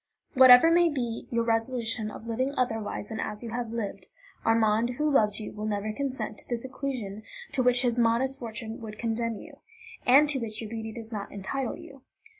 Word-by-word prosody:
"Whatever 260 +3 +8
may 345 0 +5
be 240 -6 -3
your 235 -1 +1
resolution 225 -1 0
of 220 - -10
living 255 +5 -1
otherwise 225 -4 -2
than 220 - -5
as 210 +2 -4
you 230 - -6
have 235 -1 -3
lived, 230 -4 -4 0.4
Armand, 225 +1 +2
who 300 - +1
loves 215 -8 +3
you, 215 - -6
will 215 +1 -4
never 210 0 -2
consent 265 -5 -4
to - - -9
the 240 - 0
seclusion 255 -5 -4 0.3
to 265 - 0
which 250 0 +3
his 240 -1 +1
modest 240 +3 +2
fortune 225 -1 -6
would 215 -1 -8
condemn 230 0 -1
you, - - -11 0.5
and 275 +4 +6
to 280 -2 +1
which 220 -2 -4
your 220 -2 -6
beauty 220 -1 -5
does 225 0 -7
not 205 -2 -5
entitle 225 +6 -3
you. 275 -1 -13
230 Hz, 195 wpm, -28 LUFS, 220-255 Hz, 0.5 s, Whatever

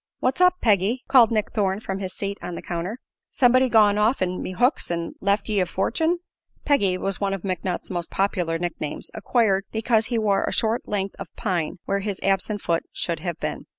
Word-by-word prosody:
"What's 260 +7 0
up, 360 0 +6
Peggy?" 215 +3 +2
called 245 -5 +6
Nick 215 -1 0
Thorne 195 -2 0
from 195 -3 -4
his 190 -2 -4
seat 200 +1 -4
on 175 - -5
the - - -7
counter. 175 +6 -4 0.3
"Somebody 255 0 +4
gone 210 -3 +5
off'n 200 -5 +1
me 185 - -4
hooks 245 - +1
an' 170 -1 -3
left 200 +1 +1
ye 210 -2 +1
a 180 - +1
fortun'?" 320 - 0 0.5
"Peggy" 200 -11 +3
was 195 +1 -2
one 195 -1 +1
of 195 - -9
McNutt's 185 -1 -3
most 175 -2 -2
popular 180 -4 0
nicknames, 165 -3 -4
acquired 205 -5 +1
because 220 0 +1
he 240 - -1
wore 205 -3 +2
a - - -2
short 225 +1 0
length 195 -1 -2
of - - -6
pine 180 -8 -2
where 200 - 0
his 200 -1 -4
absent 195 +2 0
foot 165 -1 +1
should 170 -2 -2
have 170 0 -4
been. - - -4
200 Hz, 200 wpm, -24 LUFS, 185-225 Hz, 0.5 s, up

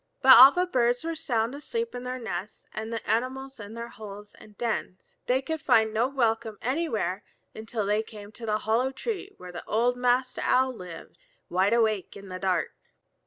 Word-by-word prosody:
But 260 0 +10
all 265 +2 +11
the 360 +4 +1
birds 245 -6 +1
were 330 0 -2
sound 245 -7 -1
asleep 460 +11 -4
in 245 0 -6
their 255 0 -3
nests 210 -4 -6
and 220 +1 -5
the 230 -1 -5
animals 260 +4 -2
in 205 +2 -9
their 235 0 -6
holes 205 -2 -10
and 210 -1 -17
dens. 220 -5 -4
They 260 +2 +2
could 320 +1 -3
find 220 -7 +3
no 230 +3 +2
welcome 225 -5 0
anywhere 250 - -1 0.3
until 220 -1 -4
they 210 +2 +2
came 210 -2 -11
to 225 +1 -9
the 215 0 +2
hollow 225 +4 +1
tree 400 - -5
where 180 -1 -10
old 240 +3 +1
Master 250 +1 +1
Owl 260 0 +3
lived, 180 -7 -10 0.3
wide 190 +4 +2
awake 220 -4 +1
in 200 -1 -11
the 185 0 -6
dark. 185 -3 0
230 Hz, 185 wpm, -27 LUFS, 210-260 Hz, 0.3 s, all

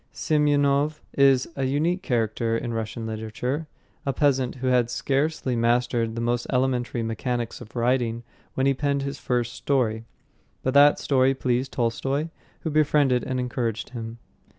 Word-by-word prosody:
Semyonov 145 0 +2
is 135 -2 +4
a 135 - -1
unique 160 +7 0
character 115 -3 0
in 120 0 -4
Russian 115 0 -4
literature, 110 +7 -3 0.4
a 140 - 0
peasant 135 -2 +1
who 130 0 -6
had 125 -2 +3
scarcely 135 +1 -1
mastered 115 -1 +1
the 115 - -3
most 120 +1 -1
elementary 125 -2 0
mechanics 115 +2 -3
of 120 0 -12
writing 120 -1 0 0.3
when 130 - +1
he 135 - +4
penned 140 0 -1
his 140 0 -4
first 120 -1 -1
story. 120 -3 0 0.6
But 130 - 0
that 145 +1 +7
story 135 -1 +2
pleased 130 0 -1
Tolstoy, 135 +6 -1 0.3
who 160 - -3
befriended 145 -4 +3
and 130 -1 -2
encouraged 120 -3 -2
him. 115 -1 -6
125 Hz, 150 wpm, -25 LUFS, 120-140 Hz, 0.6 s, that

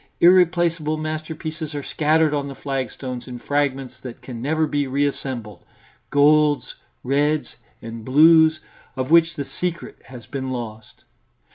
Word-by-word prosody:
Irreplaceable 170 -3 +3
masterpieces 155 0 -5
are 145 - -4
scattered 155 +1 +2
on 140 -1 -1
the 140 - -7
flagstones 130 -2 -5
in 125 -1 -7
fragments 135 -1 -1
that 125 -2 -9
can 120 -3 -7
never 155 +4 +1
be 145 -2 -1
reassembled 130 -7 -3 0.5
golds, 150 0 +3 0.3
reds 145 +3 0 0.3
and 115 0 -7
blues, 160 +4 +5 0.3
of 130 +2 -3
which 165 -1 +5
the 140 -3 -4
secret 175 +3 -5
has 125 -2 -11
been 130 -1 -5
lost. 110 -4 -7
145 Hz, 130 wpm, -22 LUFS, 130-155 Hz, 0.5 s, blues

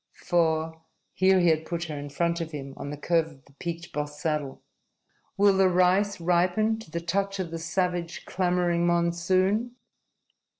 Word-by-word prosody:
For" 160 -2 +1 0.3
here 190 0 +4
he 175 -1 +4
had 160 0 +2
put 170 +1 -4
her 160 -3 -5
in 145 0 -6
front 170 +4 -1
of 165 - -4
him, 135 -2 -6
on 145 - -6
the 145 - -5
curve 165 +2 +1
of 145 -4 -17
the 140 - -22
peaked, 170 0 -5
bossed 150 0 -4
saddle 150 -4 -3 0.7
"will 200 0 +5
the 190 -1 +4
rice 185 +3 +2
ripen 180 +6 +2
to 220 - -12
the 170 - -3
touch 195 +4 -1
of 180 -4 -4
the 165 - -4
savage, 175 0 -2
clamoring 175 -2 +1
monsoon?" 185 +7 +1
170 Hz, 170 wpm, -27 LUFS, 160-185 Hz, 0.7 s, will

